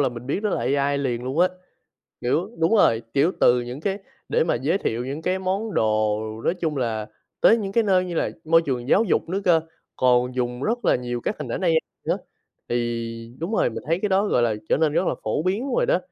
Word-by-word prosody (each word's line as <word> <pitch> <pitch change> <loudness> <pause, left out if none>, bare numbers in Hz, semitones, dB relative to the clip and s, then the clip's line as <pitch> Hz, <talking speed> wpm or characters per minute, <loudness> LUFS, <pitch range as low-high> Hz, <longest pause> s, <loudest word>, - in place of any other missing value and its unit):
là 135 - +3
mình 120 0 -9
biết 190 +9 -2
đó 210 - 0
là - - -1 0.2
AI 140 0 +1
liền 125 -3 -2
luôn 130 +5 -3
á. 180 +1 +5 0.7
Kiểu 165 - 0
đúng 165 +7 +3
rồi, 115 - +4
kiểu, 155 +7 +3
từ 125 0 +5
những 125 +4 -6
cái 195 +3 -2 0.3
để - - +2
mà - - +1
giới 150 +11 0
thiệu 120 - -2
những 140 +4 -5
cái 185 +2 0
món 190 +2 -2
đồ 110 -1 +1 0.2
nói 175 - +2
chung 155 -4 -1
là 110 -4 -2 0.3
tới 230 - +6
những 195 -2 -4
cái 230 0 +3
nơi 185 -2 +3
như 175 - -5
là - - 0
môi 165 +1 +4
trường 130 -3 -3
giáo 220 - +4
dục 175 - 0
nữa 195 +3 -1
cơ, 170 -3 +5 0.4
còn 125 0 +3
dùng 125 0 -2
rất 240 +6 -1
là - - +4
nhiều 120 -1 -4
các 210 - -3
hình - - -5
ảnh - - -3
A 180 - +1 0.4
nữa, - - +1 0.5
thì 115 -1 -3
đúng 170 +7 -4
rồi - - +2
mình 115 - -6
thấy 165 +3 +1
cái 210 - 0
đó, 195 +2 +2
gọi 125 - +2
là, 115 -2 +2
trở - - +3
nên 155 -1 +2
rất 180 - +1
là - - +1
phổ 110 +8 -1
biến 210 +10 -1
rồi - - +2
đó. - - +3
150 Hz, 245 wpm, -23 LUFS, 120-190 Hz, 0.7 s, tới